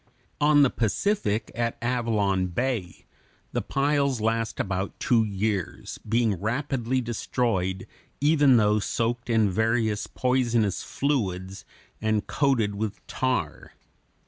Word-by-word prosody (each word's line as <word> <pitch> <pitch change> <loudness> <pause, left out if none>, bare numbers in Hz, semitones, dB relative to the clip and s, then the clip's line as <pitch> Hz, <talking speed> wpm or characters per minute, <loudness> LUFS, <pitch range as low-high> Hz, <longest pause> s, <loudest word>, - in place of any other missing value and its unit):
On 145 0 +5
the 135 - +3
Pacific, 110 - 0
at 115 0 -2
Avalon 110 -6 0
Bay, 95 -2 -3 0.5
the - - -1
piles 140 -2 +1
last 115 +1 -1
about 95 0 -2
two 115 -2 +3
years, 100 -2 -3
being 110 -4 0
rapidly 130 +2 -1
destroyed, 110 -5 -1 0.3
even 145 -3 +5
though 105 -1 +3
soaked 115 +3 -2
in 110 -2 +3
various 110 0 0
poisonous 120 -6 +1
fluids 95 -9 -2 0.4
and 110 -1 0
coated 130 -8 +1
with 105 0 -4
tar. 110 -12 -2
115 Hz, 110 wpm, -26 LUFS, 105-125 Hz, 0.5 s, On